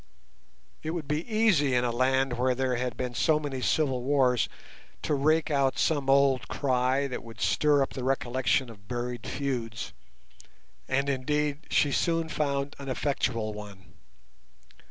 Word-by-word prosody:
It 160 +2 -3
would 160 -4 -4
be 150 - -2
easy 190 - +3
in 120 - +2
a 120 - 0
land 130 +2 +1
where 125 +1 +1
there 130 0 0
had 125 0 -3
been 125 -1 -3
so 150 +5 +2
many 140 -4 -4
civil 135 -3 +1
wars 130 -2 +2 0.5
to - - 0
rake 155 +3 +2
out 140 -2 +2
some 145 -4 +1
old 135 -2 +4
cry 130 0 +1
that 130 -2 -5
would 115 -2 -12
stir 145 +3 +3
up - - -4
the 130 - -5
recollection 130 -1 0
of 105 -2 -17
buried 120 0 -4
feuds, 125 -5 -3 0.9
and, 135 +1 0
indeed, 145 +2 -1
she 145 - +3
soon 165 +1 +1
found 140 -2 -1
an 140 -1 -6
effectual 125 -5 -1
one. 100 -4 -11
135 Hz, 155 wpm, -28 LUFS, 125-145 Hz, 0.9 s, old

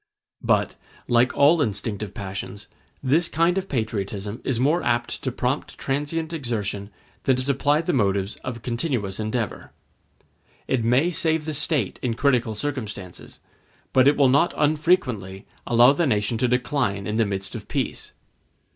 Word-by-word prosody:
But, - - +1 0.3
like 120 +1 +3
all 150 +3 +5
instinctive 105 -3 -2
passions, 100 +1 -6 0.4
this 155 +6 +3
kind 165 +3 +2
of 195 0 -2
patriotism 105 -3 -3
is 125 -3 0
more 150 +7 +2
apt 120 0 -1
to 130 - -2
prompt 125 +3 -2
transient 150 +4 -2
exertion 105 -8 -3 0.4
than 130 - +4
to 130 - -2
supply 140 +3 +2
the 175 - 0
motives 100 -4 +1
of 120 -3 -7
continuous 115 - -2
endeavor. 110 0 -3 0.9
It 125 -3 +1
may 130 +9 +3
save 160 -3 0
the 155 - -3
State 145 - 0
in 120 -3 -1
critical 120 -4 +1
circumstances, 105 -9 -5 0.5
but 130 0 +5
it 145 - +4
will 140 -2 +5
not 140 +6 +3
unfrequently 145 - +1 0.2
allow 120 +3 +6
the 165 +2 +1
nation 105 -1 0
to 125 - +2
decline 125 -5 0
in 105 +2 -2
the 115 - +3
midst 100 0 -4
of - - -7
peace. - - -3
125 Hz, 150 wpm, -24 LUFS, 105-145 Hz, 0.9 s, allow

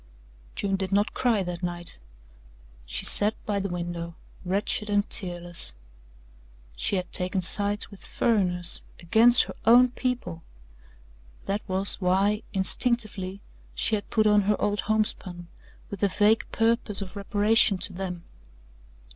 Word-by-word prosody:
June 195 -1 -1
did 190 0 -4
not 205 +2 +1
cry 230 -6 +1
that 175 -1 -6
night. 175 - -5 0.9
She - - -2
sat 210 +1 +3
by 205 -2 -1
the 200 0 -3
window 170 -1 -5 0.3
wretched 200 +3 -1
and 205 0 +1
tearless. 175 - -2 1.0
She - - -1
had 180 -1 -3
taken 185 0 +2
sides 205 +3 -1
with 200 - -14
"furriners" 180 -6 +2 0.2
against 225 +8 +7
her - - -8
own 245 +3 +6
people. 245 -11 -4 1.0
That 200 +2 -2
was 190 +2 +2
why, 195 +4 +1
instinctively, 200 -2 -2 0.3
she - - -1
had 205 -1 -2
put 215 -1 +1
on 210 -1 +4
her 210 - +1
old 205 0 -1
homespun 190 -5 -2 0.4
with 200 - -7
a 200 - +3
vague 210 +3 +2
purpose 225 -3 0
of 185 +1 -12
reparation 205 +1 +2
to 185 +1 -3
them. 180 -2 -6
200 Hz, 135 wpm, -26 LUFS, 180-210 Hz, 1.0 s, against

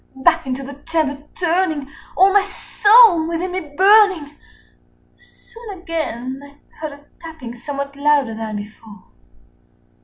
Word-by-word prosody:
30 265 - -12
Back 330 -2 +3
into 260 +1 -3
the 280 +1 -8 0.2
chamber 300 -4 -1
turning, 335 -5 -1 0.3
all 385 +1 +5
my 410 - +5
soul 410 -3 +4
within 340 +2 -3
me 370 - -2 0.2
burning, 380 -6 +4 0.8
Soon 455 -4 -13
again 275 -7 -5
I 285 0 -15 0.2
heard 310 -2 -5
a 285 0 -16 0.2
tapping 315 -8 -9
somewhat 280 +3 -6
louder 285 -4 +1
than 220 -1 -5
before. 205 -1 -10
310 Hz, 130 wpm, -19 LUFS, 270-370 Hz, 0.8 s, all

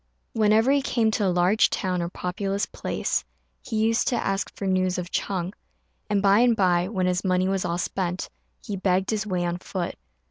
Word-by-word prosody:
Whenever 220 +3 +4
he 280 0 +3
came 230 -4 +1
to 210 -2 +1
a - - +3
large 180 +4 +3
town 185 -2 -1
or 170 - -2
populous 195 +3 -2
place - - -2 0.4
he - - -6
used 225 +1 +2
to 245 - +2
ask 195 0 -1
for 200 - -5
news 185 -1 +1
of 180 0 -5
Ch'êng; 185 -1 -2 0.6
and 200 -1 +1
by 200 +1 +5
and 240 -1 +4
by, 180 -3 +2
when 190 -3 -1
his 180 0 0
money 185 -1 +2
was 195 -1 0
all 170 - -1
spent, 180 0 -2 0.4
he 205 - -3
begged 190 +1 +1
his 215 -1 -1
way 180 -3 -1
on 175 0 -2
foot. 180 -1 -4
190 Hz, 200 wpm, -25 LUFS, 180-210 Hz, 0.6 s, by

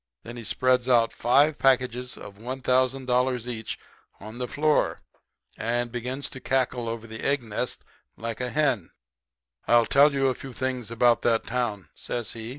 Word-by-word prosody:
Then 120 - -8
he 120 - -7
spreads 125 +3 +1
out 115 -2 +4
five 145 +5 +3
packages 125 -1 +1
of 100 0 -11
one 130 +4 -5
thousand 130 +1 +2
dollars 125 -1 +1
each 110 -3 -4 0.4
on 110 +4 -9
the 125 - -2
floor, 150 +4 +1 0.6
and 120 +1 -1
begins 125 +3 -4
to 130 - -8
cackle 125 -3 0
over 115 0 -5
the 110 0 -8 0.2
nest 120 0 -4
egg - - -39 0.3
like 115 +1 -4
a 125 - -1
hen. 135 - +1 0.8
"'I'll 120 -1 +5
tell 140 +4 +5
you 135 -1 +2
a - - +1
few 130 +1 -9
things 130 -2 -3
about 115 +1 +3
that 115 -1 +2
town,' 110 - -2
says 120 -2 -5
he. 115 0 -7
125 Hz, 170 wpm, -26 LUFS, 115-130 Hz, 0.8 s, I'll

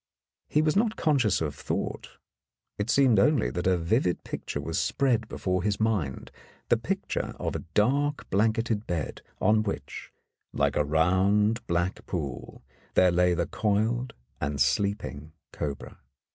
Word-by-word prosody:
He 150 - +3
was 155 -1 +2
not 215 +1 +2
conscious 130 - +2
of 75 -3 -1
thought; - - -4 0.6
it 105 +3 -2
seemed 130 -7 +5
only 135 +3 +3
that 90 +1 -2
a 95 -1 +3
vivid 90 +2 0
picture - - -5
was 80 +3 -2
spread 120 -5 +1
before 90 -3 -1
his 105 +1 -1
mind 105 -12 -1 0.2
— - - -31
the - - +5
picture - - -3
of - - -2
a - - -4
dark 140 +7 +1
blan 105 +4 +4
keted 115 -1 -2
bed 85 -4 -3 0.2
on 110 0 +4
which, 105 -2 -5 0.4
like - - +1
a - - +3
round 95 - +2
black 85 +2 -1
pool, 70 -9 -5 0.3
there 90 -1 +5
lay 90 0 +3
the 85 0 0
coiled 110 - 0 0.2
and 70 0 -2
sleeping 75 0 0 0.2
cobra. 70 -2 -5
100 Hz, 150 wpm, -27 LUFS, 85-115 Hz, 0.6 s, seemed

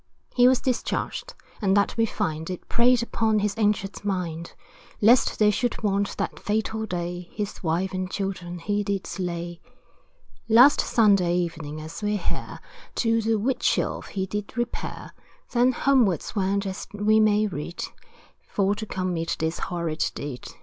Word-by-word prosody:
He 245 0 +6
was 255 -1 +4
discharged, 265 - -2 0.3
and 195 -1 +3
that 200 - +2
we 225 0 +2
find, 160 -7 -2
It 180 - -6
preyed 240 0 +4
upon 225 -2 +1
his 205 -1 0
anxious 205 -3 0
mind, 175 -4 -3 0.5
Lest 235 +4 +5
they 210 -1 +5
should 240 +2 -1
want, 200 -1 0
that - - -3
fatal 220 +1 -1
day, 175 -1 -4
His 205 -1 -4
wife 175 +3 0
and 185 0 -2
children 185 -3 -4
he 205 +4 -1
did 200 -1 -2
slay. 175 -2 -4 0.9
Last 250 +6 +7
Sunday 195 -6 +3
evening, 165 -4 -3
as 155 +5 -8
we 210 0 0
hear, 180 - -4 0.4
To 230 -1 +2
the 225 0 +1
Wheatsheaf 245 +4 0
he 190 -1 -2
did 210 +4 -5
repair, 240 0 -4 0.4
Then 245 +1 +4
homewards 245 - +2
went, 200 0 +1
as 190 0 -5
we 215 +1 +3
may 215 0 +4
read, 170 -3 -4 0.6
For 200 0 +1
to 215 +1 -5
commit 180 -4 -2
this 160 +1 -2
horrid 170 -3 -2
deed. 140 -4 -6
200 Hz, 150 wpm, -25 LUFS, 175-220 Hz, 0.9 s, Last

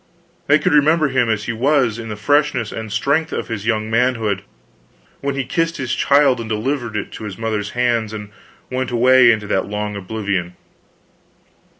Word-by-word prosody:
They 145 - +6
could 150 - 0
remember 155 +1 +4
him 125 -3 +1
as 110 -1 0
he 120 - -3
was 125 -2 +1
in 115 -1 -7
the 105 - -4
freshness 125 0 +1
and 110 -1 -6
strength 140 +9 0
of - - -4
his 110 -2 -4
young 110 -2 0
manhood, 115 -4 0 0.8
when 140 0 -2
he 135 - -1
kissed 165 +5 -1
his 130 -2 -3
child 140 -3 +3
and 115 -1 -6
delivered 115 0 -2
it 100 - -4
to 110 - -8
its 95 - -8
mother's 110 -2 -2
hands 120 -3 +1
and 105 -1 -7 0.4
went 130 0 -2
away 125 0 +5
into 110 -2 -1
that 95 -2 -1
long 105 0 -3
oblivion. 95 -3 -3
115 Hz, 180 wpm, -19 LUFS, 105-135 Hz, 0.8 s, They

